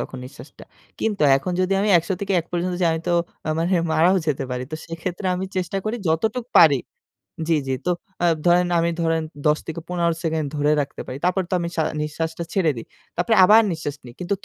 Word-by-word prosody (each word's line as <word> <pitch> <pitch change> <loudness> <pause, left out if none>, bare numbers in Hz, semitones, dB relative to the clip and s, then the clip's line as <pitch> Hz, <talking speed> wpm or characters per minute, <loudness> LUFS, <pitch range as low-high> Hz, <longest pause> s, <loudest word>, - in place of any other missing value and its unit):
তখন 130 - -6
নিঃশ্বাসটা। 130 +1 -12 0.4
কিন্তু 210 -7 0
এখন 180 +6 -3
যদি 185 +1 +1
আমি 210 - +1
১০০ 165 - -5
থেকে 200 -1 -2
১ 165 - -13
পর্যন্ত 180 +1 -1
যাই, 170 - +4
আমি 160 - -2
তো - - +2 0.5
মানে 170 +3 0 0.2
মারাও 170 +5 +4
যেতে 140 -2 0
পারি। 125 0 -3
তো - - -2
সেক্ষেত্রে 175 +3 -5
আমি 185 +1 -3
চেষ্টা 185 +1 -2
করি 220 +3 -1
যতটুক 220 +9 0
পারি 145 -5 +7 0.7
জি, 165 - +3
জি। 130 - 0
তো - - +1 0.3
আ - - +5 0.2
ধরেন 175 +1 +4
আমি 170 - +1
ধরেন 165 -1 +1 0.2
১০ 150 +1 +3 0.3
১৫ 170 -2 0
সেকেন্ড 160 -2 -1
ধরে 145 +1 +2
রাখতে 140 - -6
পারি। 130 - -5
তারপর 185 +1 +2
তো - - -2
আমি 170 0 -2
শা 160 - +1 0.2
নিঃশ্বাসটা 160 +2 -3
ছেড়ে 170 -6 +2
দেই। 115 - -7 0.3
তারপরে 180 +6 +2
আবার 215 +4 +7
নিঃশ্বাস 155 -3 -4
নিই। 120 - -11
কিন্তু 180 +3 -1
170 Hz, 205 wpm, -22 LUFS, 155-185 Hz, 0.7 s, পারি